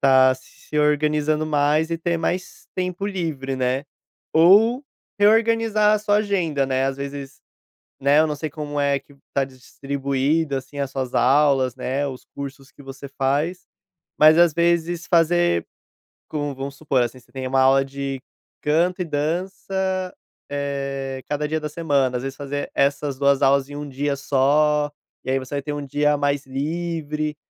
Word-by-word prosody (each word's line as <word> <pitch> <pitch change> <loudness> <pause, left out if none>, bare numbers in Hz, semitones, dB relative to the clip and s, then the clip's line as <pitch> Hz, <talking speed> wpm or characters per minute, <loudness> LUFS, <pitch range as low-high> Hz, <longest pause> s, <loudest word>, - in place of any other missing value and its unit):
tá 130 -1 +6
se 150 +3 -7
organizando 150 +1 +2
mais 150 +1 +1
e 165 - -1
ter 170 0 0
mais 180 +2 -3
tempo 180 +1 -2
livre, 155 -9 -3
né, 130 +1 0 0.5
ou 215 - +5 0.3
reorganizar 220 0 +4
a 215 - +1
sua 205 0 +2
agenda, 180 -9 0
né, 130 0 0
às 135 - -2
vezes, 140 -1 -7 0.6
né, 140 +2 +4
eu 160 - +4
não 150 - -2
sei 155 +1 -4
como 145 0 -4
é 140 -1 +2
que 145 - -21 0.2
tá 140 - +2
distribuída, 140 +3 -2
assim, 135 +2 -10
as 140 -2 -2
suas 130 -2 -4
aulas, 135 -2 +3
né, 135 +2 -2
os 130 -2 -7
cursos 140 0 -8
que - - -15
você 135 +1 -9
faz, 145 +7 0 0.5
mas 155 +1 +7
às 175 -1 +6
vezes 170 0 +1
fazer, 170 - +3 0.6
como 145 -2 -3
vamos 135 +1 -6
supor, 140 -4 +1
assim, 120 +2 -3
você 125 - -23
tem 130 -1 -4
uma 135 0 +2
aula 135 +1 +5
de 135 0 -5 0.4
canto 170 +5 +1
e - - -2
dança, 185 +4 -2 0.4
eh, 135 -2 -3
cada 150 0 -1
dia 155 0 -1
da 150 - -4
semana, 140 -5 0
às 125 - -3
vezes 135 0 -5
fazer 145 0 -4
essas 140 0 +1
2 140 -1 +3
aulas 135 0 +3
em 145 - -7
um 145 0 -6
dia 140 +1 -2
só, 145 +2 +2 0.3
e 130 - -3
aí 135 - +2
você 130 +2 -7
vai 140 - -1
ter 150 - -4
um 145 -1 -4
dia 145 +1 +2
mais 145 0 0
livre, 155 +1 -3
145 Hz, 170 wpm, -22 LUFS, 135-165 Hz, 0.6 s, mas